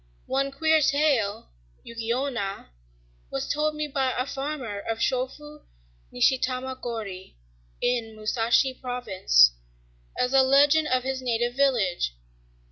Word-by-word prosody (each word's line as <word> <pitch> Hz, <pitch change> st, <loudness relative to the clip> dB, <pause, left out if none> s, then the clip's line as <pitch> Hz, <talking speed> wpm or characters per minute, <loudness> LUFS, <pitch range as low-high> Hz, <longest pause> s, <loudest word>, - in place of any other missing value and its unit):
One 275 Hz, +1 st, -1 dB
queer 315 Hz, +3 st, +2 dB
tale, 275 Hz, -, +1 dB, 0.3 s
"Yuki 230 Hz, 0 st, -5 dB
Onna," 235 Hz, -, -3 dB, 0.6 s
was 135 Hz, -, -3 dB
told 305 Hz, +1 st, 0 dB
me 300 Hz, 0 st, -2 dB
by 270 Hz, -2 st, 0 dB
a 250 Hz, -, 0 dB
farmer 270 Hz, -7 st, -4 dB
of 225 Hz, +2 st, -4 dB
Chōfu, 265 Hz, +5 st, -3 dB, 0.5 s
Nishitama 260 Hz, -, 0 dB
gōri, 210 Hz, -6 st, -6 dB, 0.5 s
in 235 Hz, -3 st, -1 dB
Musashi 230 Hz, +4 st, +1 dB
province, 205 Hz, -, +3 dB, 0.7 s
as 250 Hz, +1 st, 0 dB
a 270 Hz, -, +7 dB
legend 285 Hz, +4 st, +4 dB
of 255 Hz, -2 st, +1 dB
his 265 Hz, 0 st, -3 dB
native 240 Hz, -1 st, -1 dB
village. 215 Hz, -, +1 dB
255 Hz, 120 wpm, -26 LUFS, 225-275 Hz, 0.7 s, a